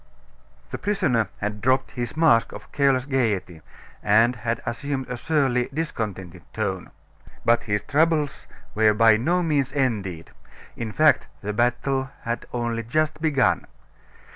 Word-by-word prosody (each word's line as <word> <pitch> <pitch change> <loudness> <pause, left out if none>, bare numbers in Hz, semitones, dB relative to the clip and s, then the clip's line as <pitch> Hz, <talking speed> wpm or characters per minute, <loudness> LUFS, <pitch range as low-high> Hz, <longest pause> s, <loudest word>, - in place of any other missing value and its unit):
The - - -4
prisoner 130 - +1
had 105 0 -3
dropped 130 +3 +1
his 120 +2 -5
mask 155 -8 +4
of - - -11
careless 135 -3 +2
gaiety, 105 - -1 0.4
and 115 +4 +4
had 115 +1 -2
assumed 130 +3 -3
a 125 - -4
surly, 130 -3 0
discontented 105 - -4
tone. 95 -4 -3 0.6
But 120 0 +3
his 105 -2 -1
troubles 150 0 +1 0.3
were 110 -1 +3
by 110 0 +6
no 175 +10 +1
means 145 -5 0
ended; 100 - -2 0.4
in 115 -2 -5
fact, 155 +7 +3
the 105 +1 -3
battle 125 +3 0
had 115 0 -3
only 120 -1 -2
just 155 +6 -1
begun. 145 -5 +2
120 Hz, 135 wpm, -24 LUFS, 110-140 Hz, 0.6 s, by